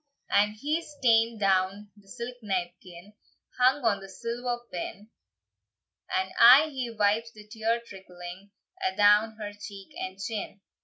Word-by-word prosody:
And 210 +1 +3
he's 295 +5 -3
taen 230 -1 +4
down 195 +1 0
the 205 -2 -22
silk 245 +3 -7
napkin, 180 -1 -5 0.5
Hung 255 +1 +3
on 200 -3 +1
a 195 - -10
silver 240 +4 -3
pin, 200 +5 -6 1.0
And 190 0 -1
aye 265 +7 +9
he 255 -3 -3
wipes 220 +1 +1
the 210 -1 -14
tear 225 +2 -1
trickling 185 -1 -11 0.3
A'down 215 - +4
her 210 -2 -6
cheek 200 -1 -10
and 185 0 -5
chin. 205 -1 -5
210 Hz, 135 wpm, -28 LUFS, 195-235 Hz, 1.0 s, aye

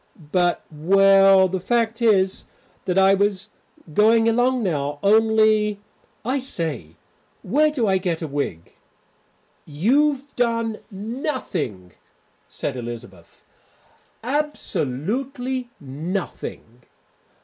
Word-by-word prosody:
But 175 -1 +1
well, 195 +4 +5
the 185 +1 -3
fact 230 +3 0
is 195 -5 +2 0.4
that 180 0 -1
I 195 0 +6
was 200 +1 +2
just 185 - -9 0.4
going 225 +4 +4
along 245 +2 +2
now, 145 -5 -2
only 215 0 +3 0.5
I 260 +3 0
say, 155 - -4 0.5
where 305 +4 +3
do 275 -7 -1
I 190 -2 +2
get 175 -3 -2
a - - -3
wig?" 140 - -4 0.9
"You've 275 - 0
done 230 -2 0
nothing," 195 - -4 0.6
said 140 - -5
Elizabeth, 115 -8 -9 0.8
"absolutely 250 - -2
nothing." 145 - -6
195 Hz, 95 wpm, -22 LUFS, 160-235 Hz, 0.9 s, I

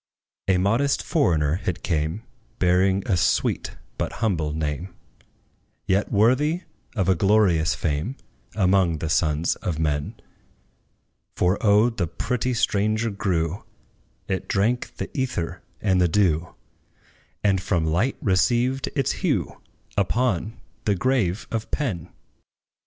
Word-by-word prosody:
A 95 -1 +4
modest 115 +10 +1
foreigner 85 - +1
it 90 - -2
came, 80 +5 -1 0.3
Bearing 95 +2 +3
a 95 - +2
sweet, 85 - 0 0.2
but - - -2
humble 80 -9 0
name; 80 +4 -3 0.9
Yet 95 +2 +1
worthy 135 - +3 0.3
of 95 -5 0
a 95 - +5
glorious 95 -3 +3
fame 80 - -2 0.4
Among 95 -4 +3
the 80 0 -3
sons 80 0 +1
of 85 -4 -3
men; 75 -2 -1 1.2
For 90 +2 +1
O 105 +3 +5
the 95 -7 -2
pretty 125 +9 -2
stranger 110 0 +1
grew: 90 -3 -1 0.6
It 95 - -2
drank 115 +5 0
the - - -6
ether 90 - -2 0.2
and 95 -3 +2
the 90 - +4
dew, 85 -2 +1 0.9
And 95 -3 +2
from 85 -4 0
light 90 +12 +1
received 120 +6 +2
its - - +1
hue - - -1 0.3
Upon 110 +1 0 0.3
the 105 - +2
grave 110 -4 0
of 115 -2 -3
PENN! 105 - -2
95 Hz, 120 wpm, -24 LUFS, 85-110 Hz, 1.2 s, a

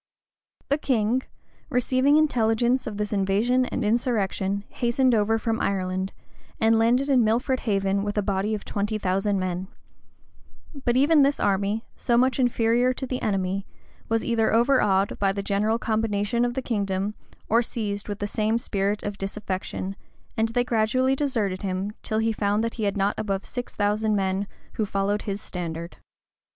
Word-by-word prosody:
The 285 +2 +2
king, 245 -2 +1 0.5
receiving 260 +2 +3
intelligence 245 -3 +2
of 210 -2 -5
this 210 0 -2
invasion 210 +6 +2
and 250 - -2
insurrection, 200 -4 0
hastened 245 +1 +1
over 220 0 +2
from 225 0 -1
Ireland, 190 0 -1 0.5
and 225 0 +4
landed 245 +4 +3
in 260 -4 +4
Milford 245 +4 +1
Haven 195 -1 +1
with 205 0 -3
a 210 - +2
body 200 +2 0
of 205 - -7
twenty 210 +1 -2
thousand 195 +1 0
men: 185 0 -2 1.2
but 240 0 +3
even 295 +3 +5
this 280 +1 +3
army, 200 +3 0
so 235 - +1
much 255 +1 +3
inferior 245 0 +2
to 265 - -5
the 255 0 -3
enemy, 195 -1 -1 0.4
was 225 0 +1
either 225 -2 +2
overawed 225 -5 +3
oy 195 -1 +3
the 200 0 -3
general 210 +3 +1
combination 220 0 0
of 240 0 -2
the 265 - -2
kingdom, 200 -3 -1 0.3
or 230 +2 +4
seized 210 -3 -4
with 205 - -3
the 205 - -3
same 215 +2 0
spirit 205 -3 -1
of 205 -1 -4
disaffection; 195 -1 -4 0.4
and 225 0 +2
they 245 +2 +1
gradually 250 +3 +2
deserted 225 -10 -1
him, 190 +1 -2
till 215 - -2
he 225 0 +1
found 205 +1 0
that 230 - -2
he 220 - -2
had 200 0 0
not 200 +1 +2
above 195 -2 -2
six 245 -1 -6
thousand 210 +1 +1
men 195 0 0 0.3
who 220 - -1
followed 200 0 0
his 200 -1 -3
standard. 170 -3 -5
215 Hz, 165 wpm, -25 LUFS, 200-240 Hz, 1.2 s, even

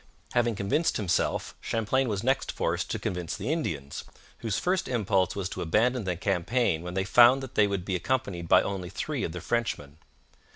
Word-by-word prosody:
Having 120 -2 +2
convinced 100 - +1
himself, 95 -5 0
Champlain 120 +4 0
was 100 -1 -2
next 135 +2 +1
forced - - -1
to - - -1
convince 90 -3 -3
the - - -2
Indians, 75 - -3 0.4
whose 110 -3 -2
first 185 0 0
impulse 95 -6 +1
was 100 -2 -2
to - - -5
abandon 115 +7 +1
the 90 -1 -1
campaign 95 0 0
when 90 +1 -6
they 95 - +1
found 120 +6 +6
that 130 - -8
they 105 - +4
would 100 -3 -3
be 95 - -1
accompanied 95 -5 -2
by - - +6
only 95 -3 -4
three 125 +8 -3
of - - -2
the 90 0 -6
Frenchmen. 90 -11 -2
100 Hz, 190 wpm, -28 LUFS, 90-125 Hz, 0.4 s, found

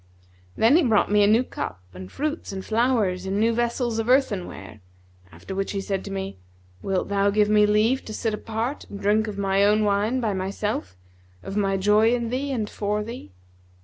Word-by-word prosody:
Then 235 +8 +5
he - - +4
brought 220 -5 +2
me 210 0 +4
a 200 - +5
new 225 +4 +4
cup 90 - -6
and 90 0 -10
fruits 305 -2 -3
and 190 -1 -6
flowers 220 -6 +1
in 195 +2 -1
new 230 +2 +3
vessels 235 0 -1
of 225 +2 -2
earthenware; 185 - 0 0.5
after 85 - -9
which 195 +1 -2
he 200 - -2
said 195 -1 -3
to 200 - -6
me, 195 - -5 0.4
'Wilt 190 -1 -1
thou 200 0 +2
give 210 +1 +2
me 210 0 +5
leave 220 +5 +2
to - - -7
sit 225 -3 -1
apart 225 +5 -3
and 200 - -8
drink 210 +2 +2
of 205 -2 -5
my 195 0 +2
own 210 +1 +4
wine 210 +5 +1
by 220 -4 -1
myself, 190 - -3 0.5
of 195 - -6
my 195 -2 +1
joy 210 +4 +4
in 235 -1 -3
thee 275 +3 -2
and 225 -5 -2
for 210 0 -2
thee?' 220 - -9
210 Hz, 200 wpm, -24 LUFS, 195-230 Hz, 0.5 s, Then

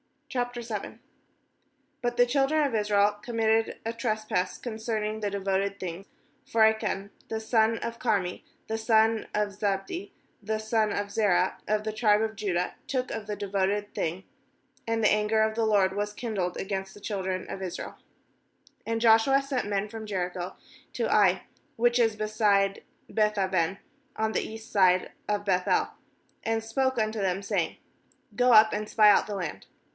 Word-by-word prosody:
n 240 -4 -4 1.0
But 240 0 -1
the 245 0 +5
children 280 +4 +2
of 275 - -2
Israel 210 -1 +2
com 235 +2 -7
mitted 225 0 +2
a 225 - -1
trespass 215 -5 -1
concerning 220 -2 -3
the 205 -1 -1
devoted 195 0 -1
thing; 185 0 -6 0.4
for 225 -1 +3
Achan, 220 -2 +1 0.2
the 220 - -3
son 225 0 +2
of 235 0 -5
Carmi, 195 -7 0 0.3
the 220 - -2
son 220 0 +3
of 210 0 +1
Zabdi, 200 - -3 0.3
the 215 +1 -2
son 215 0 0
of 205 0 -3
Zerah, 190 -4 +2
of 210 0 +1
the 215 - -2
tribe 215 -1 +3
of 220 -1 -2
Judah, 180 -4 -1
took 255 -1 -2
of 210 -2 -5
the 210 - -3
devoted 200 +1 -1
thing; 170 +4 -2 0.6
and 225 0 0
the 210 - +5
anger 210 +1 +2
of 220 0 +1
the 225 0 0
LORD 195 -3 +3
was 205 0 -2
kindled 205 -6 -3
against 190 -1 -4
the 205 - -14
children 190 -3 -3
of 195 - -6
Israel 185 -2 -6 0.9
2And 230 0 0
Joshua 230 +4 +5
sent 275 -5 -2
men 205 0 -1
from 220 0 -7
Jericho 180 -2 -3 0.4
to 235 - 0
Ai, 190 -3 +4 0.3
which 240 +1 +3
is 225 -2 +3
beside 210 -2 +1 0.3
Beth 215 -1 +1
aven, 190 -1 0 0.4
on 220 0 0
the - - 0
east 225 +1 -8
side 185 -2 +3 0.2
of 205 -1 -1
Beth 180 -2 +1
el, - - +2 0.5
and 225 0 0
spoke 260 +3 0
unto 215 0 0
them, 190 0 -1
saying: 195 -5 -1 0.6
'Go 250 0 +4
up 215 0 +8
and 210 0 -3
spy 210 -2 +6
out - - +3
the 205 - -4
land.' 175 -6 -5
215 Hz, 165 wpm, -28 LUFS, 195-225 Hz, 1.0 s, up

